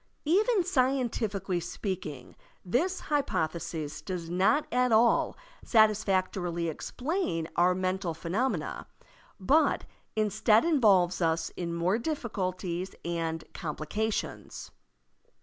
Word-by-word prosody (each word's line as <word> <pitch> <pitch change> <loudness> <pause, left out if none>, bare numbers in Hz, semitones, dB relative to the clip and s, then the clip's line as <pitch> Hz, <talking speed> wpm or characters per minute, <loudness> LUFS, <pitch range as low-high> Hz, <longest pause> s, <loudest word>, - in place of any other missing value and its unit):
Even 400 +5 +3
scientifically 240 - 0
speaking, 175 - -5 0.3
this 335 - 0
hypothesis 165 - -2
does 170 0 -5
not 195 +12 +3
at 250 0 +3
all 230 +2 +3 0.3
satisfactorily 190 -6 +2
explain 245 - -2
our 180 +1 +4
mental 185 -2 -1
phenomena, 190 +11 -2 0.5
but 285 +12 +3 0.3
instead 215 +2 +3
involves 200 - +4
us 165 0 +1
in 170 -1 -4
more 180 +6 +1
difficulties 190 - -3
and 165 -1 -2
complications. 170 +8 -4
190 Hz, 90 wpm, -29 LUFS, 170-240 Hz, 0.5 s, our